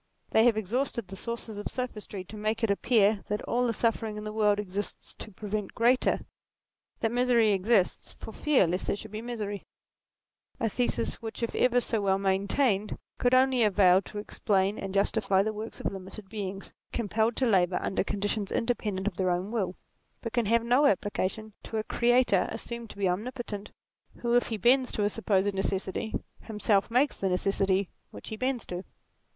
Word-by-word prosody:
They 220 - +5
have 235 -3 +4
exhausted 230 0 -2
the - - -15
resources 225 +1 -5
of 205 - -4
sophistry 210 -6 -5
to 200 - -11
make 215 +2 -2
it 220 - +3
appear 205 -1 +3
that 210 0 -2
all 245 +1 +1
the - - +1
suffering 225 -1 -1
in 210 - -5
the 215 0 -5
world 210 -2 +3
exists 200 0 -5
to - - -6
prevent 210 0 -4
greater 245 +3 +3 0.8
that 225 - +1
misery 240 -3 +3
exists, 195 0 +1
for - - -8
fear 295 -9 +3
lest 180 +2 -2
there - - +1
should 215 +1 -9
be 215 +1 -5
misery: 215 -4 -4 1.0
a - - -5
NATURE 225 - +1
37 245 - +2
thesis 115 -2 -2
which 225 +1 -6
if 230 - -1
ever 245 0 +3
so 230 -3 -1
well 195 -1 +2
maintained, 200 +3 +1 0.2
could 245 +1 +4
only 260 -1 +4
avail 195 -3 +5
to 205 - -10
explain 200 -1 0
and 195 - -4
justify 200 -1 +2
the 215 +1 -2
works 215 +2 -6
of - - -2
limited 195 +1 -9
beings, 195 -3 -6 0.2
compelled 225 0 0
to 260 - +1
labour 185 -5 +3
under 190 - -1
conditions 205 0 -2
independent 210 -5 -1
of 205 -4 -2
their 185 -1 +1
own 180 +4 -1
will; 190 -6 -1 0.5
but 230 - -4
can 240 -4 +1
have 230 +1 +3
no 250 +5 +4
application 205 +1 -1
to 225 - -5
a 215 - 0
Creator 240 -5 +3
assumed 235 -1 -5
to - - -11
be 200 -1 +1
omnipotent, 210 +2 -3 0.5
who, 235 -1 0
if 245 - +3
he 225 - -3
bends 250 +5 +3
to 210 - -1
a 205 - +3
supposed 205 -2 +1
necessity, 195 +2 -2 0.2
himself 210 -2 +1
makes 255 +5 +2
the 195 - 0
necessity 195 0 +1 0.2
which - - -10
he 220 - -4
bends 255 +1 -1
to. 180 +1 -5
215 Hz, 190 wpm, -28 LUFS, 195-235 Hz, 1.0 s, They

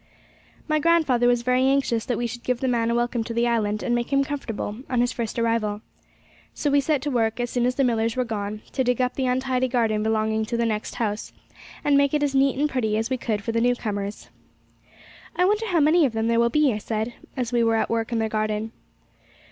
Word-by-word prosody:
My 310 -1 +2
grandfather 295 -7 +3
was 245 -1 +2
very 250 +1 +2
anxious 265 -5 +1
that 245 - 0
we 240 - -1
should 240 +1 -5
give 250 -1 -1
the 265 - -1
man 235 -2 +1
a 235 - +1
welcome 240 -1 0
to 230 - -5
the 235 +1 +2
island, 215 -3 0
and 240 - 0
make 240 +2 -1
him 275 0 +3
comfortable 235 -7 -4
on 250 - 0
his 245 +1 +2
first 235 -2 -4
arrival. 225 -3 0 0.7
So 290 - -1
we 285 0 +4
set 285 -1 0
to 295 - -2
work, 225 -2 0
as 245 -1 -2
soon 245 -1 +1
as 250 - -1
the 275 - +2
Millars 230 -2 +1
were 255 -1 0
gone, 215 -1 -4
to 260 - 0
dig 250 0 0
up 250 0 +1
the 265 -2 -1
untidy 260 0 0
garden 225 -4 +1
belonging 220 0 0
to 235 +1 -3
the 235 - +1
next 215 -2 -2
house, 215 -2 -3 0.5
and 290 - +3
make 280 +1 +2
it 295 - +1
as 285 -1 0
neat 270 -1 +3
and 295 +2 +2
pretty 220 -7 -1
as 225 +4 -2
we 260 - +1
could 215 -4 -2
for 230 - -2
the 230 0 0
new 245 +1 +3
comers. 205 -3 -5 1.1
'I 360 - +3
wonder 425 +3 +1
how 355 -5 +2
many 315 +3 +4
of 260 -5 +1
them 225 +1 0
there 230 0 +3
will 235 0 +3
be,' 295 -1 +3
I 210 - -3
said, 220 +2 -3 0.2
as 245 -2 -2
we 240 -1 +3
were 225 0 +2
at 220 - +1
work 230 0 -1
in 235 - 0
their 220 0 +1
garden. 215 0 -2
240 Hz, 245 wpm, -24 LUFS, 225-260 Hz, 1.1 s, we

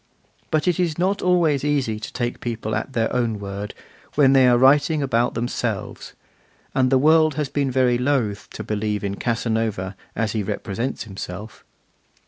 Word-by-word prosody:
But 155 +2 0
it 180 -1 +2
is 170 -4 0
not 190 +3 0
always 170 -6 +2
easy 135 -7 0
to 110 - -7
take 120 -1 -3
people 115 -2 -4
at 135 - -4
their 115 -1 0
own 115 -3 0
word, 100 +1 -6 0.4
when 135 -2 +5
they 130 -2 +6
are 120 -1 +5
writing 145 +4 +4
about 120 -2 +1
themselves; 120 +1 -3 0.6
and 130 -1 +2
the 135 - +5
world 155 +1 +4
has 150 -3 -2
been 140 -1 0
very 125 -2 +2
loth 125 -6 0
to - - -6
believe 105 -1 -2
in 100 -1 -2
Casanova 110 -4 -1 0.2
as 110 -1 0
he 110 - -1
represents 110 +5 -3
himself. 100 +1 -8
120 Hz, 165 wpm, -22 LUFS, 110-145 Hz, 0.6 s, they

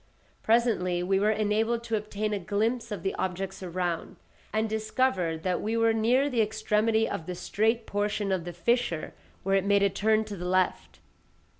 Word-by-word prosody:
Presently 220 -7 +2
we 190 +1 +2
were 210 +2 +3
enabled 220 +2 +1
to 230 -1 -1
obtain 210 0 -2
a 205 - -1
glimpse 220 +5 -1
of 195 -5 -4
the 195 - -1
objects 190 +1 -3
around, 175 -2 -3 0.4
and 220 +1 0
discovered 215 -7 0
that 180 -1 0
we 225 +2 -1
were 225 0 +3
near 240 +5 +3
the 245 -5 +1
extremity 220 +1 +1
of 160 - -5
the 180 - -4
straight 220 +5 0
portion 205 0 -1
of 185 -3 0
the 175 - -5
fissure, 175 -2 0 0.3
where 195 - 0
it 195 -1 +3
made 200 0 +3
a 200 - +3
turn 215 +2 +2
to 210 -1 -6
the 180 -1 -6
left. 185 0 0
210 Hz, 180 wpm, -28 LUFS, 185-225 Hz, 0.4 s, were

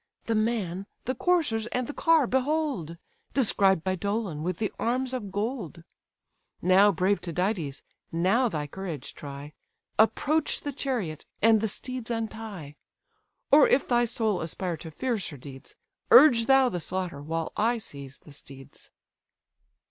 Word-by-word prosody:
"The 230 - 0
man, 210 -4 -1 0.2
the 255 - 0
coursers, 265 -7 +1
and 250 +1 -2
the 290 - -6
car 325 -3 +3
behold! 265 - -1 0.4
Described 195 - +3
by 190 - 0
Dolon, 200 -4 -2
with 175 +1 -2
the 215 0 -2
arms 255 +2 -1
of 210 -6 -4
gold. 205 - -4 0.8
Now, 190 +3 +5
brave 190 +3 +1
Tydides! 175 -4 -2 0.3
now 195 +10 +2
thy 150 -6 -3
courage 165 -2 -6
try, 145 +1 -9 0.5
Approach 280 +8 +2
the 285 - -4
chariot, 230 - -3
and 225 -1 +5
the 220 - +1
steeds 255 +3 -5
untie; 220 -9 -5 0.7
Or 290 +1 +8
if 260 - +2
thy 240 -1 +3
soul 220 -4 0
aspire 170 +2 -3
to 160 - -9
fiercer 205 - -3
deeds, 135 0 -12 0.3
Urge 300 - +7
thou 270 -1 +6
the 180 -7 -2
slaughter, 175 -3 -4
while 165 +2 -3
I 230 +3 +1
seize 140 - -9
the 150 - -16
steeds." 135 -1 -13
205 Hz, 140 wpm, -27 LUFS, 165-245 Hz, 0.8 s, Or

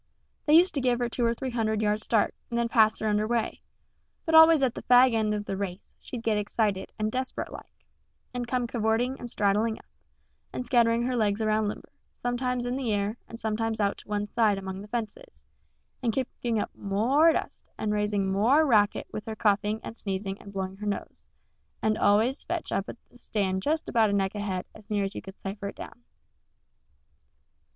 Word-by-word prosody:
They 300 - +6
used 355 +3 +6
to 280 - -1
give 250 -1 +2
her 240 0 0
two 240 - -2
or 230 0 +2
three 260 +2 -4
hundred 220 -2 0
yards 210 0 +1
start, 220 -3 +2 0.2
and 235 - -2
then 235 0 +1
pass 220 -2 +4
her 220 - -2
under 210 0 +1
way; 235 -1 -1 0.6
but 320 - -1
always 320 -2 +8
at 250 -3 +2
the - - -7
fag 250 0 +6
end 215 -1 +1
of 205 0 -4
the 195 - -3
race 190 -1 -6
she'd 240 -3 -7
get 215 -2 +1
excited 205 -2 -1
and 215 0 -1
desperate 260 +1 -3
like, - - -12 0.5
and 245 -1 -3
come 250 0 0
cavorting 235 +3 0
and 240 - -6
straddling 210 +2 +1
up, - - -17 0.7
and 250 - -4
scattering 235 -1 +3
her 250 +1 -1
legs 210 -3 +1
around 215 -1 +1
limber, 205 - -6 0.3
sometimes 245 0 -1
in 245 +1 -1
the 255 -5 -1
air 205 +1 0
and 230 - -8
sometimes 220 0 -1
out 200 -1 0
to - - -15
one 205 -1 -1
side 215 -4 +3
among 190 0 -6
the 205 - -10
fences, 240 - -6 0.6
and 235 -3 0
kicking 240 -2 -2
up - - -3
m 200 - -8
o 220 +6 +1
r 325 +1 +8
e - - +4
dust - - -4
and 210 -1 -1
raising 210 -1 0
m 190 - -1
o 210 +3 +2
r 285 +5 +6
e - - +1
racket 210 -5 +3
with 215 - -5
her 220 - -5
coughing 210 0 +1
and - - -7
sneezing 195 -2 -3
and 200 - -11
blowing 190 -1 -4
her 210 +1 -5
nose 205 - -5 0.5
and 215 0 +1
always 220 +7 +3
fetch 345 -1 -3
up 195 - -1
at - - -8
the - - -17
stand 195 -5 -1
just 310 +7 -1
about 225 -3 +3
a - - 0
neck 195 -1 +1
ahead, 200 -3 -3
as 215 -1 -16
near 205 -1 +1
as 195 +1 -3
you - - -6
could 195 0 -12
cipher 200 +1 -5
it 200 - -7
down. 245 - -10
220 Hz, 220 wpm, -27 LUFS, 205-245 Hz, 0.7 s, always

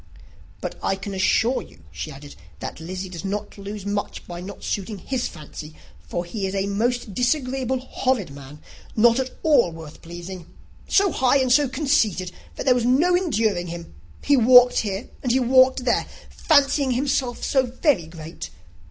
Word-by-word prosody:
"But - - -5
I 195 - 0
can 200 +1 -7
assure 225 +6 +2
you," 80 - -16
she - - -6
added, 145 0 -10 0.3
"that - - -6
Lizzy 185 +3 -5
does 175 -3 -8
not 205 +1 -4
lose 200 0 -7
much 205 0 -3
by 175 0 -7
not 200 +3 -9
suiting 205 +1 -3
his 250 +5 -2
fancy; 155 -1 -10 0.2
for 80 - -5
he 195 +2 -3
is 190 - -4
a 195 0 0
most 225 +2 -1
disagreeable, 260 +2 0
horrid 255 - -1
man, 140 +1 -12 0.3
not 235 +2 +5
at 260 -1 -4
all 280 - +4
worth 160 -2 -11
pleasing. 175 +1 -8 0.4
So 395 -2 +3
high 260 -1 +3
and 260 -2 +1
so 290 -1 +4
conceited, 245 - +1 0.2
that - - -5
there 260 - +6
was 245 -1 0
no 290 +9 +3
enduring 220 - 0
him! 170 - -8 0.3
He 285 - +4
walked 250 0 +7
here, 200 0 -3
and 250 - 0
he 260 - +3
walked 260 +1 +4
there, 245 - +1 0.2
fancying 285 -3 +3
himself 260 -1 -1
so 265 -2 +2
very 240 - +1
great! 160 0 -8
220 Hz, 170 wpm, -23 LUFS, 180-260 Hz, 0.4 s, walked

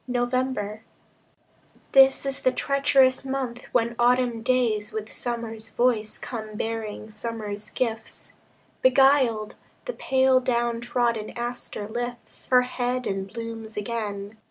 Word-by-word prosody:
November 245 -3 -1 1.1
This 270 0 +6
is 275 -1 -1
the 255 - +3
treacherous 275 -1 +3
month 265 -3 -3
when 235 -1 +1
autumn 240 -1 +3
days 230 -4 +1
With 220 0 -5
summer's 225 -2 -4
voice 230 -3 +1
come 215 -3 -6
bearing 220 -1 -4
summer's 215 -1 -5
gifts. 225 -3 -4 0.5
Beguiled, 260 -5 +4 0.3
the - - -3
pale 260 -1 +3
down 240 -2 0
trodden 235 -3 0
aster 240 -3 -5
lifts 240 +2 -6
Her 250 -1 +6
head 250 0 -2
and 195 0 -3
blooms 225 -2 -6
again. 210 -1 -4
235 Hz, 115 wpm, -25 LUFS, 220-255 Hz, 1.1 s, This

